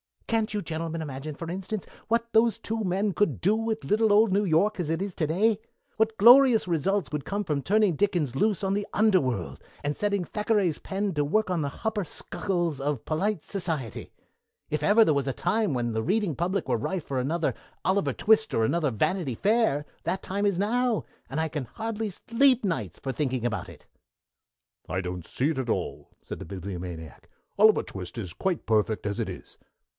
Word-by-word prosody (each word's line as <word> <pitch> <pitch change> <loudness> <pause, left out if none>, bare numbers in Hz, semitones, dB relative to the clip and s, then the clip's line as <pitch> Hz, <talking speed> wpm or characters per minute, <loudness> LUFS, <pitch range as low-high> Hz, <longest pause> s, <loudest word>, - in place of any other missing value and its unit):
"Can't 225 -2 0
you 210 - -1
gentlemen 165 -1 -4
imagine, 145 0 -6
for 165 +2 -6
instance, 190 +2 -4 0.2
what 230 0 0
those 225 0 +4
two 225 0 -3
men 195 +3 +1
could 190 -10 0
do 200 +4 +4
with 225 0 -1
little 215 0 +3
old 215 0 +5
New 205 +2 +2
York 195 +5 +2
as 165 -4 -2
it 165 +2 -1
is 195 -1 -3
to 155 - 0
day? 205 +7 +2 0.4
What 220 0 +1
glorious 240 0 +7
results 175 +2 0
would 150 -2 -3
come 205 +1 -2
from 150 -6 -1
turning 200 +1 +2
Dickens 175 -10 +1
loose 205 +7 +1
on 195 0 +1
the 205 0 -1
underworld, 175 - +1 0.2
and 145 0 -1
setting 200 -2 0
Thackeray's 205 -4 0
pen 195 0 -2
to 145 0 +1
work 215 +7 +1
on 180 -3 0
the 140 - -1
hupper 215 -3 0
sukkles 175 -2 -3
of 140 -3 -2
polite 185 +3 0
s'ciety! 160 - -3 0.6
If 150 - 0
there 150 +7 +2
ever 215 -6 +6
was 140 -1 0
a 135 - 0
time 205 - 0
when 120 -2 -1
the 110 0 -1
reading 195 - +1
public 175 +3 -1
were 125 - +2
ripe 175 +9 -3
for 135 -3 -2
another 155 +6 0 0.3
'Oliver 190 +1 +1
Twist' 220 0 +3
or 115 - +2
another 155 +5 +1
'Vanity 135 - 0
Fair', 205 - +2 0.2
that 190 - -1
time 200 +2 -1
is 200 -3 +2
now, 235 +3 +1 0.3
and 150 +4 -1
I 160 - -1
can 145 -3 -3
hardly 220 - -4
sleep 250 +6 +2
nights 185 -5 -2
for 135 - -3
thinking 130 -4 -1
about 115 -3 -2
it." - - -14 1.0
"I 90 +3 -2
don't 90 -2 -6
see 135 +4 0
it 155 - -2
at 125 -3 -3
all," - - -2 0.2
said - - -7
the - - -7
Bibliomaniac. 90 -4 -7 0.3
"'Oliver 215 0 +6
Twist' 95 +3 -8
is 95 -7 -4
quite 175 - -2
perfect 110 -1 +1
as 100 -1 -2
it - - -1
is." - - -9
180 Hz, 195 wpm, -27 LUFS, 140-210 Hz, 1.0 s, glorious